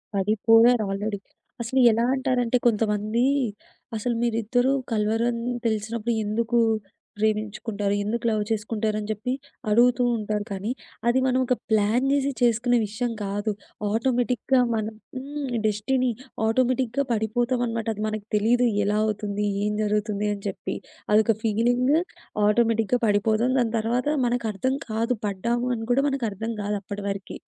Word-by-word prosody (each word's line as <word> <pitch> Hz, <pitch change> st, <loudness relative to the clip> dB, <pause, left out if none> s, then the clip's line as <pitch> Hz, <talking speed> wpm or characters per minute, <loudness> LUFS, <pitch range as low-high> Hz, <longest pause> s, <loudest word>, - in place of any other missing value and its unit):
పడిపోయారు 225 Hz, +4 st, +4 dB
ఆల్రెడీ. 205 Hz, +1 st, -2 dB, 0.4 s
అసలు 235 Hz, +3 st, 0 dB
ఎలా 225 Hz, +1 st, +1 dB
అంటారంటే 250 Hz, -2 st, +1 dB
కొంతమంది 215 Hz, +1 st, +1 dB, 0.7 s
అసలు 235 Hz, +2 st, -1 dB
మీరుద్దరూ 240 Hz, +2 st, +1 dB, 0.2 s
కల్వరని 230 Hz, +3 st, 0 dB
తెలిసినప్పుడు. 220 Hz, +1 st, -1 dB
ఎందుకు 230 Hz, +3 st, 0 dB, 0.6 s
ప్రేమించుకుంటారు? 210 Hz, -1 st, -1 dB
ఎందుకు 235 Hz, +3 st, -2 dB
లవ్ 215 Hz, -1 st, +1 dB
చేసుకుంటారు? 215 Hz, 0 st, -1 dB
అని 210 Hz, -, -5 dB
జెప్పి 215 Hz, +4 st, -2 dB, 0.4 s
అడుగుతూ 245 Hz, +3 st, +4 dB
ఉంటారు. 210 Hz, -1 st, -2 dB
కానీ 200 Hz, +4 st, -3 dB, 0.4 s
అది 240 Hz, +2 st, +4 dB
మనం 255 Hz, 0 st, +2 dB
ఒక 250 Hz, -, +2 dB
ప్లాన్ 220 Hz, +4 st, +2 dB
జేసి 280 Hz, 0 st, +2 dB
చేసుకునే 240 Hz, +1 st, +3 dB
విషయం 235 Hz, +4 st, -2 dB
కాదు. 205 Hz, +2 st, -2 dB, 0.4 s
ఆటోమేటిక్‌గా 245 Hz, +2 st, +1 dB, 0.2 s
మనం 220 Hz, 0 st, -2 dB, 0.2 s
హ్మ్. 280 Hz, +1 st, -5 dB, 0.2 s
డెస్టిని 250 Hz, +5 st, +1 dB, 0.4 s
ఆటోమేటిక్‌గా 255 Hz, +3 st, +1 dB
పడిపోతాం 240 Hz, +3 st, 0 dB
అనమాట. 230 Hz, 0 st, -3 dB
అది 210 Hz, -, -4 dB
మనకు 215 Hz, -1 st, -4 dB
తెలీదు. 240 Hz, +4 st, +3 dB, 0.2 s
ఎలా 205 Hz, +1 st, +1 dB
అవుతుంది? 210 Hz, -1 st, -2 dB, 0.2 s
ఏం 210 Hz, 0 st, 0 dB
జరుగుతుంది? 210 Hz, 0 st, 0 dB
అని 200 Hz, -, -12 dB
చెప్పి. 190 Hz, 0 st, -4 dB, 0.4 s
అదొక 220 Hz, +1 st, +4 dB
ఫీలింగ్ 240 Hz, +4 st, +2 dB, 0.6 s
ఆటోమేటిక్‌గా 225 Hz, +2 st, +2 dB
పడిపోతాం. 215 Hz, +4 st, +2 dB
దాని 230 Hz, -2 st, 0 dB
తర్వాత 240 Hz, +4 st, -1 dB, 0.2 s
మనకు 240 Hz, -1 st, -1 dB
అర్థం 260 Hz, +6 st, 0 dB
కాదు 230 Hz, +3 st, 0 dB
పడ్డాము 235 Hz, +5 st, -1 dB
అని 225 Hz, -1 st, -5 dB
గూడా 270 Hz, +3 st, +3 dB
మనకు 270 Hz, -3 st, -2 dB
అర్థం 225 Hz, +4 st, -4 dB
గాదు 205 Hz, +1 st, -1 dB
అప్పటి 200 Hz, +1 st, -6 dB
వరకి. 195 Hz, 0 st, -5 dB
225 Hz, 135 wpm, -25 LUFS, 210-245 Hz, 0.7 s, పడిపోయారు